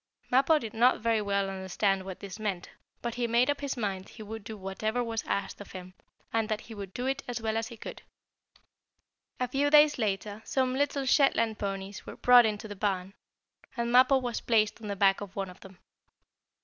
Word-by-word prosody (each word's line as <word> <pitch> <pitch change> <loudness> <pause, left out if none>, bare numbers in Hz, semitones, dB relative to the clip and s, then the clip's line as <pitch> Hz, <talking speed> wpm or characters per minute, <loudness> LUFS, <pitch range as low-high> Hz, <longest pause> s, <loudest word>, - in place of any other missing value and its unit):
Mappo 270 +5 +5
did 225 -7 -5
not 240 +3 +4
very 225 -1 +2
well 200 -1 0
understand 195 +1 0
what 190 -1 -8
this 200 +1 -8
meant, 195 -5 -3 0.3
but 235 -1 -2
he 240 0 -1
made 240 +4 +3
up 285 0 -4
his 280 -2 -3
mind 195 -4 -3
he 220 - -10
would 220 0 -7
do 220 +1 -7
whatever 215 +5 -2
was 225 -1 -3
asked 200 - -2
of 205 - -11
him, 185 -1 -9 0.4
and 225 -1 +1
that 215 -1 -1
he 225 - -11
would 200 -3 -7
do 245 +5 -4
it 270 +1 -1
as 245 -1 -3
well 220 -1 -2
as 225 0 -1
he 235 - -10
could. - - -8 1.4
A 250 - 0
few 275 +4 +1
days 300 -1 +6
later 210 0 -2
some 260 +1 0
little 280 0 0
Shetland 230 -5 +3
ponies 195 0 -4
were - - -7
brought 245 -2 +7
into 215 0 -4
the 205 - -7
barn, 195 -1 -2 0.6
and 235 0 -1
Mappo 255 +2 +6
was 245 -3 -3
placed 220 -1 +1
on 215 - -7
the 200 - -2
back 195 0 +3
of 200 -2 -8
one 195 -2 -3
of 180 - -16
them. 190 -1 -14
220 Hz, 210 wpm, -29 LUFS, 200-245 Hz, 1.4 s, brought